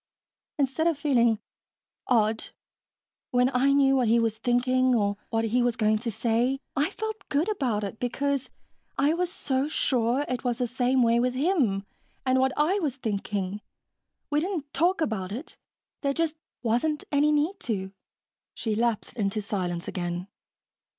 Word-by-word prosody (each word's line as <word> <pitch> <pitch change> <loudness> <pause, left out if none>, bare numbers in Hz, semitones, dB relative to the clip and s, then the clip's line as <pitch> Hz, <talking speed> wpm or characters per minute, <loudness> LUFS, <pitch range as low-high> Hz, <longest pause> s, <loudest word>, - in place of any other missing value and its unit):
Instead 285 +3 +1
of 330 -4 +1
feeling... 240 -6 +3 0.7
odd... 220 -2 +2 0.8
when 250 -1 +3
I 265 +2 +3
knew 275 -1 +4
what 255 -3 +2
he 230 +2 +4
was 225 -1 0
thinking 255 +1 +2
or 205 -2 +1
what 225 0 0
he 240 +3 +2
was 240 -1 +1
going 215 -1 +2
to 235 - -3
say, 235 +4 +1 0.2
I 290 +5 +2
felt 435 +1 -6
good 290 +4 +1
about 245 - -1
it, 200 +2 -5
because 275 +2 -1 0.5
I 290 +3 +3
was 355 +1 -1
so 270 -6 -1
sure 255 -2 +1
it 255 -1 -3
was 245 -2 0
the 250 - 0
same 250 +1 +2
way 230 0 +4
with 250 +1 +1
him 260 - +1 0.4
and 260 0 +3
what 265 0 +3
I 345 +7 +3
was 295 -8 -1
thinking. 205 -4 -3 0.7
We 295 - +3
didn't 320 -4 -3
talk 350 +2 +2
about 210 -10 -1
it. 250 +10 -6 0.5
There 280 -1 +1
just 330 -2 +1 0.3
wasn't 245 +7 +1
any 295 +1 +4
need 305 +6 +1
to." 190 -3 -1 0.6
She 220 - -2
lapsed 230 -1 -1
into 205 -1 0
silence 180 -4 -3
again. 175 0 -3
250 Hz, 160 wpm, -27 LUFS, 220-285 Hz, 0.8 s, knew